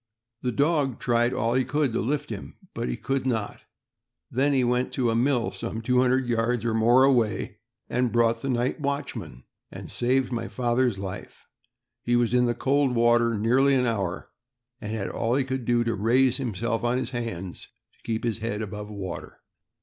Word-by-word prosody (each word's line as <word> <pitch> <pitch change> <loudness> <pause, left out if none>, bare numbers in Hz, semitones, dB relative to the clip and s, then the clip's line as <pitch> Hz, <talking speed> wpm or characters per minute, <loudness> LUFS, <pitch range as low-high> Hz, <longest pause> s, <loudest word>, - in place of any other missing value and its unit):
The 125 - -1
dog 140 -1 +1
tried 120 0 +2
all 115 -2 0
he 130 +1 +2
could 140 -1 0
to - - 0
lift 145 +2 -2
him, 100 - -7 0.2
but - - -3
could 135 -1 0
not. 110 -5 -2 0.7
Then 135 +4 +2
he 135 -2 +2
went 125 +1 +1
to 120 -3 +1
a - - 0
mill 125 0 +1
some 115 -1 -5
two 125 +2 +2
hundred 130 +1 +2
yards 120 0 0
or 115 - +1
more 120 +4 +5
away, 125 -5 +1 0.3
brought 120 -2 +1
the 135 - -3
night 125 +3 0
watchman, 140 - -4 0.3
and - - -9
saved 130 +1 +1
my 120 -2 -2
father's 120 -2 0
life. 95 -1 -7 0.6
He 120 - +1
was 120 -1 +2
in 125 0 +4
the 120 - 0
cold 135 -1 +1
water 120 -1 +3
nearly 130 +6 +3
an 125 -1 +2
hour, 100 -6 -2 0.5
and 105 -1 -6
had 110 -3 -3
all 115 +1 0
he 135 - +2
could 130 -1 -4
do 120 0 +2
to 115 -1 0
raise 125 +5 +3
himself 115 -2 -2
on 120 +1 +1
his 130 -1 -3
hands 115 -8 -5 0.3
to - - -34
keep 110 -1 -2
his 115 -2 -1
head 110 -1 -3
above 105 0 -6
water. 95 -4 -7
120 Hz, 185 wpm, -26 LUFS, 115-130 Hz, 0.7 s, more